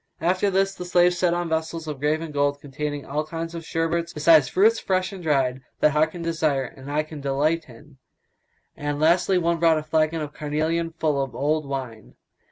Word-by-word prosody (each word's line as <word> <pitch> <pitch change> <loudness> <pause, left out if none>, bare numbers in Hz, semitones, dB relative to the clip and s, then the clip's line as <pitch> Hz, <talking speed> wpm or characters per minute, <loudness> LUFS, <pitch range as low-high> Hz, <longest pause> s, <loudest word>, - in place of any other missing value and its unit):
After 185 +4 +1
this 195 0 +1
the 180 - -7
slaves 175 0 +3
set 175 -2 +2
on 175 0 -2
vessels 160 0 -3
of 150 -3 -5
graven 155 +2 -1
gold, 145 0 0
containing 145 0 -5
all 150 +2 -2
kinds 165 +1 -5
of 165 -1 -6
sherbets, 165 +1 -1
besides 155 -2 +5
fruits 215 - +3
fresh 185 +1 -1
and 190 - -8
dried, 135 -5 +1 0.2
that 150 - +4
heart 155 +2 +2
can 175 -2 -6
desire 155 -5 0
and 135 +2 -9
eye 150 +1 +1
delight 150 +1 -1
in; 130 +3 -16 0.8
and 145 0 -3
lastly 175 +4 +3
one 170 -1 +1
brought 165 -1 +4
a 155 - -3
flagon 155 +1 +1
of 150 -1 -5
carnelion 155 +3 -1
full 155 -4 -1
of 135 -2 -4
old 150 +1 0
wine. 120 - -6
155 Hz, 190 wpm, -24 LUFS, 145-170 Hz, 0.8 s, besides